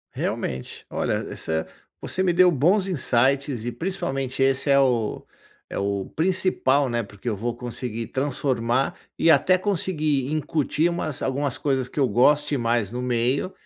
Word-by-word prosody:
Realmente, 65 0 -4
olha - - -1 0.2
essa 80 0 -2 0.3
você 185 - -2
me 185 -2 +3
deu 180 0 +6
bons 180 +7 +2
insights 135 - +1
e 120 - -2
principalmente 135 -8 -2
esse 135 +1 +1
é 140 - +6
o 120 -5 +1 0.4
é - - -4
o 100 -1 -1
principal, 160 -6 +2
né, 120 -1 -1
porque 100 +1 -11
eu 110 - 0
vou 120 +4 -3
conseguir 120 -2 -4
transformar 130 -2 0 0.2
e 165 - +5
até 180 +6 +4
conseguir 155 -8 0
incutir 155 +1 0
umas 155 -5 -3
algumas 135 0 -1
coisas 130 -3 -1
que 145 - -5
eu 135 - +4
goste 145 +4 +3
mais 115 -3 0
no 125 +1 -4
meio 125 +7 0
135 Hz, 155 wpm, -24 LUFS, 120-155 Hz, 0.4 s, deu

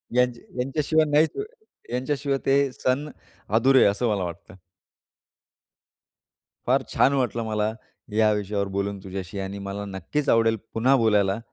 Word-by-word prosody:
यांच्या 125 -1 +2 0.2
यांच्याशिवाय 155 +4 +1
नाहीत 150 +2 +3 0.5
यांच्याशिवाय 135 +2 -1
ते 135 +1 +4 0.2
सण 140 +4 -1 0.5
अधुरे 130 +3 +5
आहे - - +6
असं 115 +4 -1
मला 100 -3 0
वाटतं. 85 +2 -8 2.1
फार - - +3
छान 140 - +4
वाटलं 120 -4 0
मला 105 0 0 0.4
ह्या 110 0 +4
विषयावर 100 -1 -2
बोलून 100 0 -2
तुझ्याशी 95 0 -6
आणि 95 +1 -5
मला 100 +1 -5
नक्कीच 100 - -3
आवडेल 115 -1 +3 0.2
पुन्हा 130 +5 +3
बोलायला. 105 -4 +2
115 Hz, 130 wpm, -25 LUFS, 100-135 Hz, 2.1 s, आहे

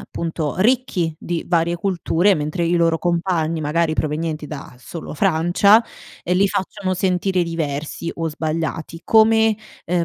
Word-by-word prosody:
appunto, 160 -3 -4
ricchi 200 -8 +1
di 170 -1 -3
varie 170 0 +1
culture 185 +1 +1
mentre 155 +3 -2
i 170 - +1
loro 165 -1 +2
compagni, 170 -2 0
magari, 155 +2 +1
provenienti 155 0 -2
da 140 -4 -8
solo 155 +6 -8
Francia, 180 +6 +4 0.4
ehm, 180 +1 0
li 200 +1 +4
facciano 195 -1 -2
sentire 185 0 +1
diversi 160 -1 -3
o 165 -1 -2
sbagliati, 160 +1 -3
come, 220 0 +4 0.3
ehm, 175 0 +1
170 Hz, 135 wpm, -20 LUFS, 160-185 Hz, 0.4 s, Francia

